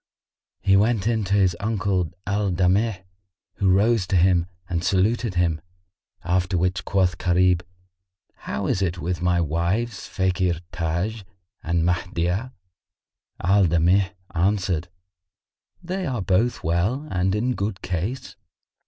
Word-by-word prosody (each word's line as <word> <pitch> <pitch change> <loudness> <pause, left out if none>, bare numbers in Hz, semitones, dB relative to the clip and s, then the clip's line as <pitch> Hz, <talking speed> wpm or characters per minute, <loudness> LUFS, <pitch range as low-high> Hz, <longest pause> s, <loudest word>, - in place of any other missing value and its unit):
He 95 - +4
went 105 0 +2
in 115 -1 +1
to 100 +2 +1
his 95 -3 +3
uncle 100 -5 0 0.2
Al 100 0 0
Damigh, 95 +3 +1 0.5
who 95 - +2
rose 105 +1 +3
to 95 - 0
him 90 -1 +3 0.2
and 85 -1 -2
saluted 100 +4 +1
him; 85 -3 +1 0.6
after 90 +1 0
which 90 +1 0
quoth 90 -4 +1
Gharib, 90 0 +3 0.7
"How - - -5
is 95 - 0
it 90 -2 0
with 85 +1 -3
my 90 0 +2
wives 85 +7 -1
Fakhr 90 -2 0
Taj[FN#53] 85 +6 -2 0.4
and 85 0 0
Mahdiyah?" 90 +5 -1 0.9
Al 95 +1 +4
Damigh 90 +4 +2 0.2
answered, 90 -2 0 1.0
"They 185 +1 -3
are 120 -7 -2
both 110 +6 +1
well 95 - 0
and 95 +2 +1
in 120 +4 0
good 100 -3 -4
case." 95 +9 -3
95 Hz, 125 wpm, -23 LUFS, 90-105 Hz, 1.0 s, He